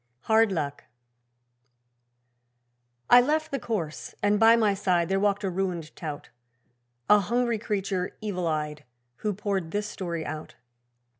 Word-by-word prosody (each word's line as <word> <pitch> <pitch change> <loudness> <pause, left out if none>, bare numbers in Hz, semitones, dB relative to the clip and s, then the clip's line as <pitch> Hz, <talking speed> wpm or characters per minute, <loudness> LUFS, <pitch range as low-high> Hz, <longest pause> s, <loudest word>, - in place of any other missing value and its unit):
Hard 220 -1 +3
Luck 145 -5 -3 2.2
I 245 - +8
left 310 +4 0
the 275 - -1
course, 175 -12 -4
and 205 0 +3
by 225 +1 +7
my 215 -3 +3
side 180 -3 +1
There 195 0 +2
walked 205 0 +1
a 195 - 0
ruined 175 -4 -3
tout 150 -4 -6 0.8
A 210 - +7
hungry 235 +3 0
creature 195 -4 -2
evil 185 -5 -2
eyed, 150 -2 -2 0.3
Who 210 -1 -2
poured 195 -4 -2
this 205 +4 -2
story 170 -6 -4
out. 155 +1 -6
195 Hz, 135 wpm, -27 LUFS, 170-215 Hz, 2.2 s, I